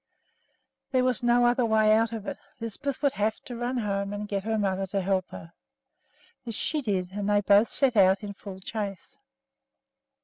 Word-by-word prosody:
There 255 Hz, -2 st, +3 dB
was 255 Hz, -2 st, +1 dB
no 240 Hz, 0 st, +4 dB
other 245 Hz, +1 st, +3 dB
way 220 Hz, -1 st, +4 dB
out 225 Hz, +1 st, +2 dB
of 220 Hz, -3 st, -6 dB
it, -, -, -5 dB, 0.2 s
Lisbeth 260 Hz, +6 st, -4 dB
would 280 Hz, -, +3 dB
have 215 Hz, +2 st, 0 dB
to 245 Hz, -, -8 dB
run 240 Hz, +2 st, -2 dB
home 200 Hz, -3 st, -2 dB
and 205 Hz, 0 st, -4 dB
get 200 Hz, -1 st, -2 dB
her 220 Hz, +2 st, -1 dB
mother 195 Hz, -2 st, -1 dB
to 195 Hz, +1 st, -1 dB
help 185 Hz, -1 st, 0 dB
her. 165 Hz, +1 st, -10 dB, 0.9 s
This 230 Hz, -3 st, -5 dB
she 305 Hz, +6 st, -1 dB
did, 190 Hz, -7 st, -2 dB
and 205 Hz, +1 st, -3 dB
they 205 Hz, 0 st, +3 dB
both 205 Hz, +2 st, +5 dB
set 265 Hz, -4 st, +2 dB
out 190 Hz, 0 st, +4 dB
in 205 Hz, -1 st, -5 dB
full 195 Hz, -1 st, -10 dB
chase. 200 Hz, -2 st, -6 dB
210 Hz, 190 wpm, -27 LUFS, 195-240 Hz, 0.9 s, both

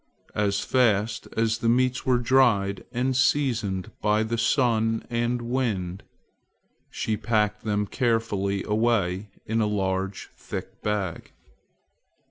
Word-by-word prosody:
As 100 Hz, -1 st, 0 dB
fast 110 Hz, -4 st, +1 dB
as 110 Hz, 0 st, +1 dB
the 115 Hz, -, +1 dB
meats 125 Hz, +2 st, +1 dB
were 125 Hz, -1 st, +4 dB
dried 115 Hz, -6 st, +2 dB
and 130 Hz, +2 st, 0 dB
seasoned 115 Hz, -9 st, +1 dB
by 105 Hz, +1 st, +2 dB
sun 115 Hz, -2 st, +1 dB
and 120 Hz, +1 st, 0 dB
wind, 105 Hz, -7 st, -2 dB, 0.9 s
she 110 Hz, -, -2 dB
packed 105 Hz, -1 st, 0 dB
them 105 Hz, -1 st, 0 dB
carefully 105 Hz, -5 st, 0 dB
away 105 Hz, -3 st, 0 dB, 0.2 s
in 110 Hz, +1 st, 0 dB
a 105 Hz, -, +2 dB
large 95 Hz, -1 st, -2 dB
thick -, -, -7 dB
bag. 100 Hz, -5 st, -3 dB
110 Hz, 110 wpm, -25 LUFS, 100-120 Hz, 0.9 s, were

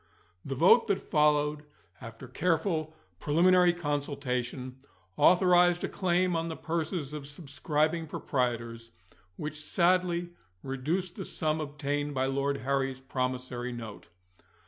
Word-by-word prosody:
The 135 Hz, -, -4 dB
vote 180 Hz, -, +5 dB
that 200 Hz, -, +1 dB
followed, 150 Hz, -1 st, +2 dB, 0.4 s
after 115 Hz, +3 st, -9 dB
careful 160 Hz, +2 st, -1 dB, 0.2 s
preliminary 180 Hz, +4 st, +4 dB
consultation, 140 Hz, -5 st, -3 dB, 0.4 s
authorised 175 Hz, -1 st, +5 dB
a -, -, +1 dB
claim 180 Hz, -1 st, +1 dB
on 165 Hz, 0 st, -1 dB
the 160 Hz, -, -4 dB
purses 160 Hz, -3 st, -3 dB
of 145 Hz, -2 st, -6 dB
subscribing 150 Hz, +2 st, -1 dB
proprietors, 115 Hz, -5 st, -3 dB, 0.4 s
which 150 Hz, 0 st, -4 dB
sadly 175 Hz, +2 st, +1 dB, 0.3 s
reduced 160 Hz, +8 st, -2 dB
the -, -, -4 dB
sum 155 Hz, -1 st, -1 dB
obtained 145 Hz, -1 st, -3 dB
by 130 Hz, 0 st, +1 dB
Lord 140 Hz, +1 st, 0 dB
Harry's 135 Hz, 0 st, -1 dB
promissory 125 Hz, -1 st, -3 dB
note. 115 Hz, -3 st, -9 dB
150 Hz, 115 wpm, -29 LUFS, 135-170 Hz, 0.4 s, vote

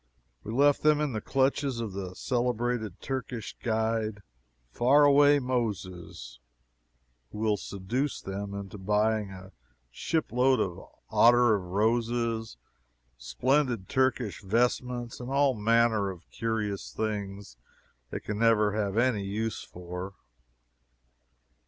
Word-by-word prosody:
We 110 Hz, -, -6 dB
left 140 Hz, +4 st, +3 dB
them 150 Hz, -1 st, +4 dB
in 150 Hz, -4 st, -1 dB
the 110 Hz, -, -3 dB
clutches 135 Hz, 0 st, 0 dB
of 110 Hz, -4 st, -4 dB
the 95 Hz, -2 st, -6 dB
celebrated 120 Hz, -4 st, -1 dB
Turkish 125 Hz, -4 st, -5 dB
guide, 110 Hz, -2 st, -1 dB, 0.5 s
"FAR 135 Hz, -, +4 dB
AWAY 145 Hz, 0 st, +6 dB
MOSES," 100 Hz, -, -4 dB, 0.9 s
who -, -, -9 dB
will 110 Hz, -1 st, +1 dB
seduce 105 Hz, +9 st, -3 dB
them 100 Hz, +1 st, -5 dB
into 100 Hz, 0 st, -7 dB
buying 105 Hz, +1 st, +1 dB
a 95 Hz, 0 st, -11 dB, 0.4 s
ship 160 Hz, -, -2 dB
load 125 Hz, +1 st, +3 dB
of 90 Hz, -5 st, -2 dB, 0.3 s
ottar 120 Hz, 0 st, +6 dB
of 100 Hz, -, 0 dB
roses, 115 Hz, -, 0 dB, 0.6 s
splendid 125 Hz, -, 0 dB
Turkish 130 Hz, -5 st, 0 dB
vestments, 120 Hz, +3 st, -1 dB
and 125 Hz, 0 st, -6 dB
all 140 Hz, 0 st, +3 dB
manner 110 Hz, -2 st, +2 dB
of 90 Hz, -3 st, -10 dB
curious 110 Hz, -3 st, -3 dB
things 100 Hz, -, -4 dB, 0.5 s
they -, -, -4 dB
can 105 Hz, 0 st, -5 dB
never 110 Hz, -2 st, +4 dB
have 105 Hz, -1 st, -2 dB
any 120 Hz, -4 st, +2 dB
use 110 Hz, +3 st, -3 dB
for. 90 Hz, +2 st, -8 dB
110 Hz, 120 wpm, -28 LUFS, 100-125 Hz, 0.9 s, AWAY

